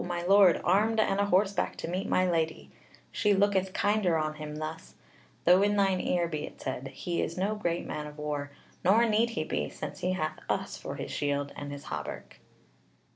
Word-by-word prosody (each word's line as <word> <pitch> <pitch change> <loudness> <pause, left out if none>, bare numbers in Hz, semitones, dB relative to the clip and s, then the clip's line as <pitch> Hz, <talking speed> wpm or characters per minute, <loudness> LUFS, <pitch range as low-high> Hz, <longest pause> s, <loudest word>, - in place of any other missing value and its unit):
my 175 -1 -3
Lord, 195 -1 +6
armed 215 +5 +3
and 200 -2 +2
a 200 - +3
horseback 200 +1 +1
to - - -5
meet 185 +4 -3
my 185 0 +3
lady: 165 -2 -1 0.4
she 210 -2 +2
looketh 190 -1 +2
kinder 205 -4 +2
on 155 -1 -1
him 150 -1 -7
thus; 155 +1 -6 0.5
though 180 +2 +6
in 205 +1 +3
thine 195 -2 +2
ear 175 -1 +1
be 155 -2 -4
it - - -9
said, 130 0 -4
he 170 +4 -3
is 165 - -3
no 195 +3 0
great 175 -5 -2
man 150 0 -4
of 150 0 -11
war; 150 -1 -3 0.3
nor 215 +6 +5
need 225 +1 +2
he 155 - +1
be, 75 - -2
since - - -7
he 180 +1 0
hath 155 -4 -2
us - - -1
for - - -6
his - - -6
shield 145 -1 -1
and 145 0 -6
his 145 0 -7
hauberk." - - -6
175 Hz, 200 wpm, -29 LUFS, 155-200 Hz, 0.5 s, Lord